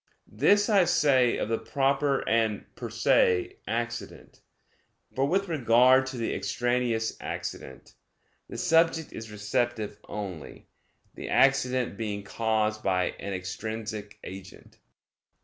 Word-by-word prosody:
This 200 - +4
I 200 -4 +4
say 135 -7 +3
of - - -2
the 115 0 -1
proper 140 0 0
and 110 -2 +1
per - - -7
se 400 -6 +2
accident; 120 +1 -5 0.7
for 135 +1 +1
with 195 +5 +1
regard 130 -3 +4
to 130 -1 -6
the 115 - -2
extraneous 120 -1 -1
accident, 65 - -7 0.6
the - - -7
subject 165 -1 +2
is 110 0 -8
receptive 105 0 -2
only, 95 -7 -7 0.5
the - - -7
accident 130 -5 +2
being 105 -2 -4
caused 110 0 -1
by 90 -3 +1
an 100 - -5
extrinsic 105 +2 -5
agent. 95 -1 -11
120 Hz, 115 wpm, -27 LUFS, 105-135 Hz, 0.7 s, This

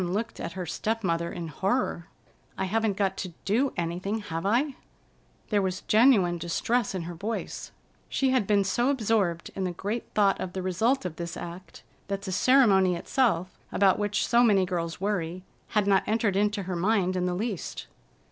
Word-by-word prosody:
Dawn 180 0 -2
looked 225 +3 -3
at - - -5
her 185 -1 -4
step 220 +7 -2
mother 170 -1 0
in 170 -2 -5
horror. 190 - -1 0.5
"I 190 - -1
haven't 215 0 0
got 195 -2 0
to 185 -3 -5
do 250 +7 +2
anything, 180 +5 -2
have 190 -4 -4
I?" 260 +7 +2 0.8
There 205 -1 +3
was 185 0 -2
genuine 210 -7 +4
distress 195 +7 0
in 180 - -3
her 175 +1 -6
voice. 210 +7 -5 0.4
She 270 -1 +1
had 250 -7 +2
been 205 -1 +3
so 240 +6 +1
absorbed 215 -10 0
in 195 - -2
the 185 - 0
great 205 +6 -3
thought 200 -2 +3
of 180 -1 -4
the 190 - -3
result 220 +7 +1
of 170 -3 -5
this 170 0 -5
act 175 0 -9 0.2
that 200 0 -3
the 190 - -4
ceremony 195 -6 +4
itself, 185 -2 0 0.2
about 195 0 +3
which 205 -1 0
so 240 0 +5
many 200 -5 +4
girls 170 -2 -3
worry, 185 -3 -2 0.3
had 210 - +4
not 195 -1 +4
entered 215 -2 +1
into 205 0 +1
her 185 0 -3
mind 185 0 +1
in 180 0 0
the 180 - -1
least. 205 -1 -4
195 Hz, 185 wpm, -27 LUFS, 180-220 Hz, 0.8 s, so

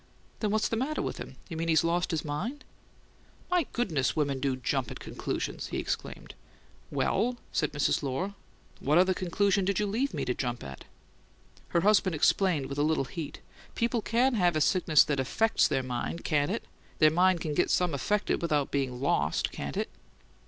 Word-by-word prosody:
"Then 215 - 0
what's 215 +1 +1
the - - -1
matter 270 +7 -1
with - - -3
him? - - -8
You 170 - -6
mean 165 +1 -2
he's 160 0 +4
lost 170 +1 +1
his 160 -3 -2
mind?" 220 - -4 0.9
"My 355 -5 +2
goodness, 165 - 0
but - - -13
women 140 -3 0
do 135 -1 0
jump 130 0 -1
at - - -8
conclusions!" - - -4
he - - -4
exclaimed. - - -4 0.6
"Well," 245 +2 0
said 155 -4 0
Mrs. 145 -1 +1
Lohr, 145 +9 -2 0.5
"what 150 +4 +2
other 185 +1 +5
conclusion 195 +2 +1
did 195 +1 0
you 210 - +1
leave 235 +8 0
me - - -3
to 125 - 0
jump 120 -1 -3
at?" 70 -1 -9 0.8
Her 170 - +1
husband 195 -3 +3
explained 160 -2 +2
with 140 +1 -5
a - - +3
little 155 -3 +1
heat: 150 +3 -7 0.3
"People 235 0 0
can 245 +5 +2
have 180 -6 +2
a 155 - +1
sickness 160 -2 +5
that 145 -2 -1
AFFECTS 220 - +2
their 135 -1 0
mind, 125 +6 -4
can't 145 -1 +1
they? 215 - -1 0.4
Their 155 -1 +6
mind 180 +2 +3
can 155 - -2
get - - +2
some 180 -3 +2
affected 205 +9 0
without 150 -4 0
bein' 130 -3 -1
LOST, 140 - +1
can't 70 0 -5
it?" - - -2
165 Hz, 190 wpm, -29 LUFS, 140-200 Hz, 0.9 s, Their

